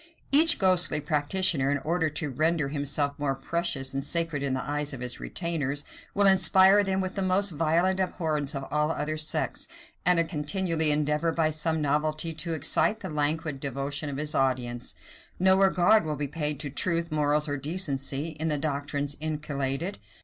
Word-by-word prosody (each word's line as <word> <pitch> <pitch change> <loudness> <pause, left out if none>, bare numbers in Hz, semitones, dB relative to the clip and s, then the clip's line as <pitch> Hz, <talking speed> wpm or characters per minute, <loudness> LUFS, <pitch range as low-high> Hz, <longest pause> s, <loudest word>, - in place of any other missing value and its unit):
Each 315 +4 +5
ghostly 180 -5 +3
practitioner, 150 0 0
in 145 - +1
order 160 +3 -1
to 150 -1 -4
render 155 +1 0
himself 145 0 -1
more 140 -2 -1
precious 135 -2 -2
and 135 0 -2
sacred 165 -3 -1
in 135 -2 -1
the 130 - -3
eyes 145 0 -3
of 135 - -6
his 125 0 -4
retainers, 150 -5 -3 0.3
will 200 0 +3
inspire 190 +1 +6
them 190 -1 -1
with 185 0 -3
the 195 - -3
most 190 +1 +1
violent 165 +4 +1
abhorrence 155 -5 -2
of 135 - -4
all 150 +1 +1
other 155 -1 -2
sects, 155 0 -2 0.4
and 170 -2 +3
continually 160 +1 0
endeavor, 150 +2 +1
by 160 -1 +1
some 155 0 0
novelty, 155 +3 0
to 160 +1 -3
excite 160 +8 +2
the 190 - -6
languid 150 0 -1
devotion 140 +2 -3
of 140 - -5
his 150 +1 -2
audience. 125 -2 -1 0.4
No 190 +1 +5
regard 195 +2 +4
will 155 -1 -3
be 145 0 -3
paid 150 -1 -2
to 145 - -4
truth, 170 +2 0
morals, 150 0 +1
or 145 - -2
decency, 145 -1 -2
in 160 - -1
the 150 -2 0
doctrines 145 0 -2
inculcated. 150 +2 -3
155 Hz, 170 wpm, -27 LUFS, 145-170 Hz, 0.4 s, inspire